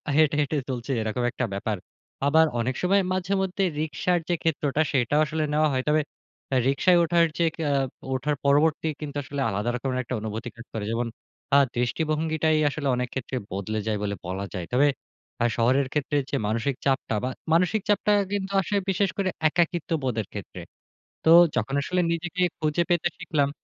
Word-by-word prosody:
হেঁটে, 155 -1 +4
হেঁটে 145 +1 -1
চলছি 125 +1 -4
এরকম 110 +3 -2
একটা 120 - -2
ব্যাপার। 105 +1 -2 0.5
আবার 160 +3 +5
অনেক 125 +3 -1
সময় 195 +2 +3
মাঝেমধ্যে 190 +1 0 0.2
রিকশার 160 +3 0
যে, 175 - +3
ক্ষেত্রটা 150 -2 +1
সেটাও 135 +2 +2
আসলে 155 +1 -2
নেওয়া 155 +1 +3
হয়। 130 0 0
তবে 155 +1 +4 0.5
অ্যা 130 - +1
রিকশায় 175 +6 +4
ওঠার 170 0 +4
যে, 170 - +3 0.2
অ্যা 145 - +1 0.4
ওঠার 140 +3 0
পরবর্তী 150 +3 +3
কিন্তু 145 -1 -5
আসলে 140 +1 -4
আলাদা 105 +3 -1
রকমের 130 +1 -2
একটা 125 +1 -4
অনুভূতি 110 +3 -4
কাজ 115 +1 -11
করে। 110 -2 -3
যেমন 115 +1 -1 0.5
আ - - +8 0.2
দৃষ্টিভঙ্গিটাই 155 +5 +1
আসলে 145 -1 -3
অনেক 125 0 -1
ক্ষেত্রে 130 0 -4
বদলে 100 +3 -3
যায় 110 -1 0
বলে 100 0 -1
বলা 95 +2 -3
যায়। 90 -4 -4
তবে 140 +4 +5 0.5
অ্যা 120 - +3
শহরের 130 +4 +3
ক্ষেত্রে 145 0 0
যে, - - -2
মানসিক 115 +5 0
চাপটা 135 -4 +1
বা 125 - 0 0.2
মানসিক 180 +5 +3
চাপটা 210 0 +3 0.2
কিন্তু 200 -1 -2
আসে 200 +3 -2
বিশেষ 195 +1 +2
করে 195 -2 +1 0.2
একাকিত্ববোধের 155 - 0
ক্ষেত্রে। - - -7 0.6
তো 160 - +5 0.3
যখন 135 - -1
আসলে 180 +5 0
নিজেকে 175 +2 -2 0.2
খুঁজে 155 +1 +1
পেতে 175 -1 +2
শিখলাম 145 -3 0
145 Hz, 170 wpm, -25 LUFS, 125-165 Hz, 0.6 s, আ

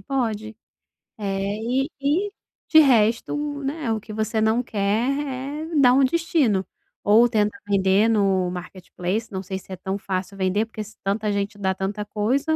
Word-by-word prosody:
pode. 220 -5 -2 0.6
Eh, 195 -1 -2
e 260 +5 0
e, 335 +9 +1 0.4
de 315 - +8
resto, 235 -5 +3 0.3
né, 275 -3 -2
o 220 - 0
que 215 - -10
você 220 +1 -1
não 220 +3 +2
quer, 215 +3 0 0.6
é - - -1
dar 270 -4 +6
um 270 - +5
destino. 280 - +1 0.4
Ou 220 +4 +6
tenta 210 +1 +1
vender 195 +1 +3
no 195 -5 +2
marketplace, 180 +3 -4
não 190 0 -4
sei 190 +1 -4
se 190 - -16
é - - -3
tão 190 +2 -4
fácil 195 -1 -4
vender, 190 +3 +1
porque 220 -1 -7
se 215 +1 -14
tanta 205 +2 0
gente 200 +1 -2
dá 190 -2 0
tanta 205 +2 -3
coisa, 260 +10 0
215 Hz, 165 wpm, -23 LUFS, 195-245 Hz, 0.6 s, de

